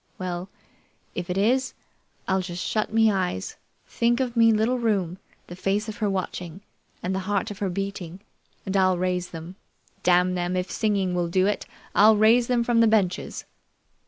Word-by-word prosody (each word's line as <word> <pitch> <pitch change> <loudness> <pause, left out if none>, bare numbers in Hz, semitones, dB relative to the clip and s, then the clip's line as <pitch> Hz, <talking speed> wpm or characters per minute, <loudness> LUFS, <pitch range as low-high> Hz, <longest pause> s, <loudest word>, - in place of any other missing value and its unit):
Well, 180 0 -4 0.6
if 175 - -5
it 180 - -1
is, 250 +6 +1 0.5
I'll 190 0 +1
just 180 -1 -5
shut 215 -1 -1
me 220 0 +4
eyes, 180 - -2 0.3
think 235 +1 +1
of 250 -2 -1
me 230 -1 +6
little 225 +4 +1
room, 195 -6 0 0.3
the 175 - -9
face 195 +4 -1
of 215 - -6
her 210 -2 0
watching, 185 -2 -4 0.4
and 185 - -1
the 190 - -1
heart 205 +2 0
of 205 - -9
her 200 -3 -1
beating, 185 -2 -5 0.5
and 195 0 -3
I'll 185 -1 +3
raise 180 0 -1
them. 170 +3 -9 0.4
Damn 180 0 +3
them, 180 0 -1
if 180 0 -3
singing 200 -4 0
will 175 -1 0
do 185 +2 +2
it, 205 - -1 0.3
I'll 215 +2 +6
raise 230 +3 +5
them 245 -2 +2
from 235 -1 +2
the 230 - +6
benches!" 205 -5 0
195 Hz, 180 wpm, -25 LUFS, 180-220 Hz, 0.6 s, me